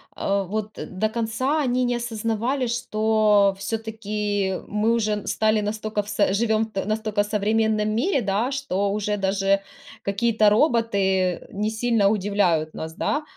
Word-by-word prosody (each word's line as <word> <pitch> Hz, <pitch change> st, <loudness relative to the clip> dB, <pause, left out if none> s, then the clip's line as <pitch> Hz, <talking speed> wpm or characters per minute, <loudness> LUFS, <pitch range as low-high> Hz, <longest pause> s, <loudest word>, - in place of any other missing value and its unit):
Э, 200 Hz, 0 st, 0 dB
вот 210 Hz, +3 st, -4 dB
до 190 Hz, +3 st, -2 dB
конца 235 Hz, +7 st, -1 dB
они 250 Hz, -2 st, +1 dB
не 245 Hz, 0 st, 0 dB
осознавали, 235 Hz, +3 st, -1 dB
что 215 Hz, -4 st, +2 dB
всё-таки 210 Hz, -2 st, -2 dB
мы 210 Hz, +2 st, +1 dB
уже 215 Hz, -3 st, -1 dB
стали 215 Hz, 0 st, +2 dB
настока 215 Hz, 0 st, -2 dB
в 205 Hz, -, -12 dB
с 205 Hz, -2 st, +1 dB
живем 220 Hz, +1 st, +1 dB
в 195 Hz, -, -1 dB
настолько 215 Hz, -1 st, 0 dB
современном 215 Hz, +1 st, +1 dB
мире, 275 Hz, -, +1 dB
да, 205 Hz, +5 st, 0 dB
что 205 Hz, -8 st, -1 dB
уже 210 Hz, 0 st, -1 dB
даже 195 Hz, 0 st, +1 dB, 0.4 s
какие-то 215 Hz, +1 st, +2 dB
роботы 200 Hz, -, +1 dB
не 210 Hz, +2 st, -1 dB
сильно 220 Hz, -2 st, +2 dB
удивляют 190 Hz, -6 st, +1 dB
нас, 160 Hz, 0 st, -6 dB
да. 295 Hz, -, -1 dB
215 Hz, 140 wpm, -23 LUFS, 200-225 Hz, 0.4 s, что